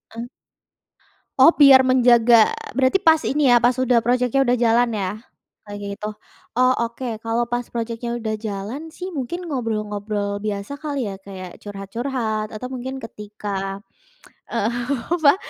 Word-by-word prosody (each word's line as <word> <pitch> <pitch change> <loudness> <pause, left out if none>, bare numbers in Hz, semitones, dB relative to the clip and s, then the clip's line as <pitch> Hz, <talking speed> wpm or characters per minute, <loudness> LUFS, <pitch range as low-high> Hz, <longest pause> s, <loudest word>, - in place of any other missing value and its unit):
Eh. 230 - -5 1.2
Oh, 270 +5 +9
biar 275 -3 +8
menjaga 240 -3 +5 0.2
berarti 265 +7 +3
pas 320 -4 +4
ini 290 0 +1
ya, 240 - +7
pas 245 +1 +4
udah 245 -3 +3
projeknya 250 +2 +2
udah 245 -1 +2
jalan 235 +1 +3
ya, 190 -2 -1 0.5
kayak 205 -1 -8 0.2
gitu? 210 - -6 0.5
Oh, 255 0 +5
oke. 235 +2 -5 0.2
Kalau 230 +1 0
pas 240 +1 -2
projeknya 235 +1 -4
udah 220 -1 -2
jalan 215 +9 -6
sih 360 +3 -7
mungkin 340 +7 -4
ngobrol-ngobrol 210 -5 -3
biasa 205 +5 -4
kali 285 -5 -3
ya? 195 - -5
Kayak 185 -2 -9
curhat-curhat 215 +2 -3
atau 220 +3 -6
mungkin 260 +1 -6
ketika, 205 -3 -6 0.7
eee, 230 -1 -1 0.4
apa, 320 -4 +5
235 Hz, 140 wpm, -22 LUFS, 210-260 Hz, 1.2 s, Oh